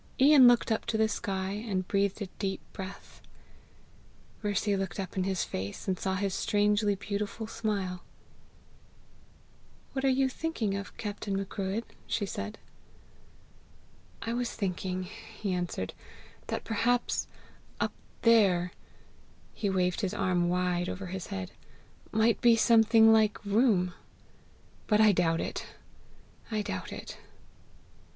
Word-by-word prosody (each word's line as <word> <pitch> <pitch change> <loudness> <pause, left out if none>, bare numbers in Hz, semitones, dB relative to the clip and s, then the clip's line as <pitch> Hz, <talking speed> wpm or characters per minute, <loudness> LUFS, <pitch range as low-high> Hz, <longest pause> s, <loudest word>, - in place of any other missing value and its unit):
Ian 270 -1 +8
looked 240 -1 +4
up 220 - 0
to 220 - 0
the 220 0 +4
sky, 195 -3 -2
and 200 -3 -2
breathed 200 +1 0
a - - -5
deep 195 -2 -1
breath. 190 0 -9 1.2
Mercy 205 -1 +1
looked 195 0 -3
up 190 -2 -5
in 185 -1 0
his 190 -2 0
face, 95 +2 -5
and 185 -2 0
saw 190 -1 -1
his 195 0 -1
strangely 205 0 +2
beautiful 205 +2 -4
smile. 200 -5 -2 1.9
"What 265 - -2
are 270 - +4
you 265 +1 +3
thinking 255 -7 -2
of, 200 0 -6
Captain 205 -2 -3
Macruadh?" 195 +2 -2 0.2
she 205 - 0
said. 100 - -5 1.7
"I 230 - -2
was 240 0 -1
thinking," 185 -2 -2
he 210 0 -6
answered, 175 - -3 0.5
"that - - -3
perhaps 235 +2 0 0.5
up - - 0 0.3
THERE" 195 -7 +5 0.8
he 205 - -1
waved 180 0 +1
his 195 -3 -1
arm 175 -1 +1
wide 180 0 0
over 195 +1 -5
his 190 -3 -5
head 95 -1 -5 0.6
"might 220 +1 +3
be 235 -2 +6
something 225 0 +6
like 215 -2 +2
room; 200 -4 +3 0.9
but 210 -1 +3
I 215 -1 +7
doubt 165 -3 +2
it, - - -4 0.8
I 215 -2 -1
doubt - - -4
it!" - - -8
200 Hz, 130 wpm, -30 LUFS, 185-220 Hz, 1.9 s, Ian